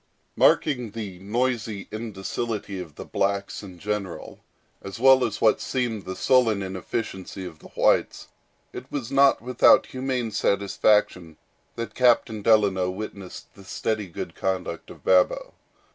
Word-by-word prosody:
Marking 125 Hz, -6 st, +3 dB
the 100 Hz, -4 st, -7 dB
noisy 110 Hz, 0 st, -2 dB
indocility 105 Hz, -1 st, -4 dB
of 80 Hz, -5 st, -9 dB
the -, -, -8 dB
blacks 100 Hz, 0 st, -2 dB
in 95 Hz, -4 st, -11 dB
general, 100 Hz, -2 st, -5 dB, 0.4 s
as 100 Hz, -, -8 dB
well 130 Hz, +1 st, +6 dB
as 105 Hz, -2 st, -2 dB
what 110 Hz, -, +3 dB
seemed 120 Hz, -5 st, -2 dB
the 95 Hz, 0 st, -5 dB
sullen 115 Hz, -6 st, +3 dB
inefficiency 95 Hz, 0 st, -5 dB
of 80 Hz, -4 st, -10 dB
the -, -, -13 dB
whites -, -, +1 dB, 0.5 s
it -, -, -9 dB
was 130 Hz, -6 st, -4 dB
not 140 Hz, -3 st, +4 dB
without 125 Hz, 0 st, +5 dB
humane 130 Hz, -3 st, -3 dB
satisfaction 100 Hz, -5 st, +1 dB, 0.4 s
that 115 Hz, 0 st, -5 dB
Captain 120 Hz, -3 st, +2 dB
Delano 100 Hz, -4 st, +3 dB
witnessed 95 Hz, -1 st, -8 dB
the 100 Hz, -, -15 dB
steady 105 Hz, +2 st, -3 dB
good 85 Hz, -, -7 dB
conduct 95 Hz, -1 st, -3 dB
of -, -, -13 dB
Babo. 90 Hz, -1 st, +2 dB
105 Hz, 135 wpm, -25 LUFS, 95-120 Hz, 0.5 s, well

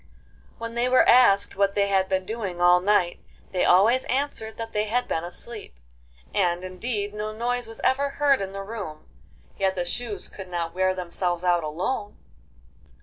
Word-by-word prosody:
When 230 Hz, 0 st, -6 dB
they 240 Hz, +1 st, +1 dB
were 255 Hz, -, +5 dB
asked 200 Hz, -5 st, +5 dB
what 200 Hz, 0 st, +1 dB
they 200 Hz, 0 st, +2 dB
had 190 Hz, -1 st, +1 dB
been 190 Hz, -1 st, 0 dB
doing 205 Hz, -5 st, -4 dB
all 175 Hz, 0 st, +6 dB
night, 185 Hz, -2 st, +2 dB, 0.3 s
they 185 Hz, -, 0 dB
always 220 Hz, +8 st, +5 dB
answered 255 Hz, -5 st, -2 dB
that 225 Hz, 0 st, -6 dB
they 210 Hz, 0 st, +1 dB
had 245 Hz, +4 st, -1 dB
been 165 Hz, -, -1 dB
asleep; 205 Hz, -, -8 dB, 0.6 s
and, 175 Hz, -2 st, +1 dB
indeed, 205 Hz, +2 st, -4 dB
no 210 Hz, +1 st, -4 dB
noise 240 Hz, +2 st, -2 dB
was 225 Hz, -, -8 dB
ever 280 Hz, +2 st, +2 dB
heard 280 Hz, -3 st, +2 dB
in 195 Hz, -1 st, -4 dB
the 195 Hz, 0 st, -6 dB
room, 195 Hz, -8 st, -7 dB, 0.5 s
yet 190 Hz, -1 st, +1 dB
the 175 Hz, -1 st, -2 dB
shoes 215 Hz, +3 st, -4 dB
could 190 Hz, -2 st, -10 dB
not 170 Hz, -2 st, -3 dB
wear 185 Hz, 0 st, +1 dB
themselves 175 Hz, -1 st, -2 dB
out 175 Hz, -2 st, +2 dB
alone! 185 Hz, +8 st, -3 dB
200 Hz, 175 wpm, -25 LUFS, 180-230 Hz, 0.6 s, all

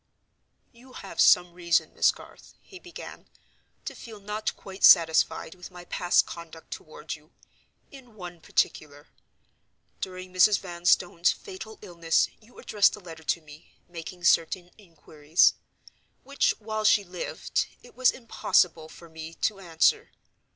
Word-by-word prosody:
"You 250 Hz, +2 st, -18 dB
have 195 Hz, -, -4 dB
some 175 Hz, -1 st, +5 dB
reason, 170 Hz, -2 st, 0 dB
Miss -, -, +4 dB
Garth," -, -, -9 dB
he 375 Hz, -, -13 dB
began, 355 Hz, -1 st, -11 dB, 0.6 s
"to -, -, -5 dB
feel 220 Hz, -3 st, -11 dB
not 210 Hz, +2 st, -4 dB
quite 190 Hz, 0 st, -11 dB
satisfied 160 Hz, -1 st, +5 dB
with 180 Hz, -1 st, -11 dB
my 180 Hz, -1 st, -12 dB
past 175 Hz, 0 st, +2 dB
conduct 165 Hz, -1 st, -11 dB
toward 460 Hz, -1 st, -8 dB
you, -, -, -14 dB, 0.6 s
in 255 Hz, -6 st, -15 dB
one 175 Hz, -4 st, -9 dB
particular. 145 Hz, -2 st, -2 dB, 0.9 s
During 185 Hz, -1 st, -7 dB
Mrs. 185 Hz, +3 st, +5 dB
Vanstone's 175 Hz, -1 st, +1 dB
fatal 370 Hz, -, -9 dB
illness, 170 Hz, -4 st, +1 dB
you 230 Hz, +3 st, -22 dB
addressed 205 Hz, -2 st, +2 dB
a -, -, -13 dB
letter 165 Hz, -4 st, -11 dB
to 170 Hz, -, 0 dB
me, 150 Hz, +1 st, -16 dB
making 175 Hz, +1 st, -9 dB
certain 175 Hz, +1 st, +2 dB
inquiries; 160 Hz, -4 st, +1 dB, 0.7 s
which, 275 Hz, +2 st, +1 dB
while 215 Hz, 0 st, -4 dB
she 210 Hz, -1 st, +4 dB
lived, 180 Hz, -1 st, -3 dB, 0.2 s
it -, -, -16 dB
was 255 Hz, -1 st, +4 dB
impossible 170 Hz, -9 st, 0 dB
for 170 Hz, -, -14 dB
me 160 Hz, 0 st, -10 dB
to 205 Hz, -3 st, -1 dB
answer. 165 Hz, -4 st, +1 dB
180 Hz, 135 wpm, -27 LUFS, 165-215 Hz, 0.9 s, some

